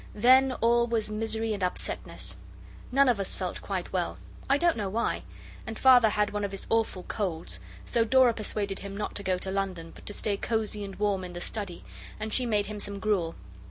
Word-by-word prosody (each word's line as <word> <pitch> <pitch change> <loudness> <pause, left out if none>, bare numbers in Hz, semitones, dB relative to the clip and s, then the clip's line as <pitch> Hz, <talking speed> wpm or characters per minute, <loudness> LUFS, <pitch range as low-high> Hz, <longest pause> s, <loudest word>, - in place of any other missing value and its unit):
Then 260 +4 +6
all 235 +1 +4
was 225 -2 0
misery 225 +1 -1
and 200 - -4
upsetness. 180 0 -2 0.6
None 275 +2 +5
of 240 -5 +3
us 195 - -1
felt - - -4
quite - - -4
well; - - -1 0.3
I 275 - +5
don't 340 +2 +3
know 205 -3 -2
why: 230 +4 0 0.5
and 225 0 -5
Father 250 -4 +7
had 210 0 +1
one 205 0 -2
of 200 - 0
his 195 0 -5
awful 225 -5 +1
colds, 175 -6 -3 0.3
so 235 -2 +2
Dora 255 +1 +5
persuaded 205 -2 -2
him 200 0 -7
not 210 - -3
to - - -2
go 185 -1 +1
to 190 +1 -3
London, 185 -4 -2
but - - -15
to 205 - -3
stay 205 -1 +1
cosy 215 -2 -1
and 195 -1 -7
warm 205 -2 0
in 180 -1 -7
the 175 - -5
study, 195 -2 -4 0.4
and 215 0 -3
she 250 -2 +1
made 210 -3 +2
him 210 0 -6
some 200 0 -3
gruel. 195 -5 0
210 Hz, 210 wpm, -28 LUFS, 195-230 Hz, 0.6 s, Father